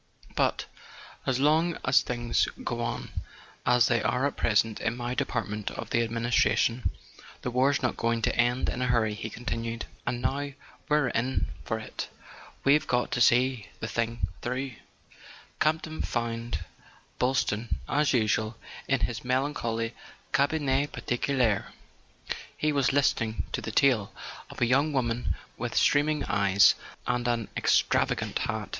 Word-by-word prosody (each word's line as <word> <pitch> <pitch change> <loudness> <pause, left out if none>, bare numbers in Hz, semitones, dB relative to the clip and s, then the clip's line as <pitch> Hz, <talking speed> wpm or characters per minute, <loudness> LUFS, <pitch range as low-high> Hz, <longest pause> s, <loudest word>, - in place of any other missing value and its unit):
"But, - - +1 0.6
as 130 -1 +1
long 160 +4 +3
as 125 0 +5
things 120 -1 0 0.2
go - - -2
on - - -3 0.6
as 125 -2 +5
they 120 0 +2
are 125 +5 +1
at 140 - -1
present 110 0 +1
in 115 +1 -1
my 120 0 -2
department 105 -3 -2
of - - -7
the 115 - +3
administration, 115 +1 +2 0.5
the 125 - -2
war's 135 +3 +2
not 125 - 0
going 115 -1 0
to - - +2
end 120 +1 +2
in 125 - -2
a 125 - +1
hurry," 115 -3 +2
he 110 +1 -5
continued. 115 0 -4 0.2
"And 120 - 0
now 140 +3 -1 0.4
we're 150 -3 +3
in 125 +3 0 0.2
for 110 - -1
it, 110 - -6 0.6
we've 150 +2 +4
got 125 -1 +1
to 125 - 0
see 120 -1 +4
the 110 - -3
thing 115 -2 -1 0.2
through." 130 +2 -2 0.9
Campton 155 0 0
found 115 -7 -2 0.5
Boylston, 125 -3 0
as 145 0 +2
usual, 110 -2 +1 0.3
in 135 -1 +2
his 115 -2 -1
melan¬ 130 +4 0
choly 115 -3 -2 0.4
cabinet 140 -1 +2
particulier. 120 -4 0 0.8
He 155 - +1
was 140 -3 +2
listening 115 -5 +1
to - - -2
the - - -5
tale 110 -3 +3 0.4
of - - -10
a - - +5
young 140 +5 +2
woman 120 -3 0 0.2
with - - -4
streaming 150 +1 +3
eyes 100 -1 +5 0.3
and 125 -1 0
an 115 -2 0
ex¬ - - +3
travagant - - 0
hat. - - -3
120 Hz, 150 wpm, -28 LUFS, 115-135 Hz, 0.9 s, as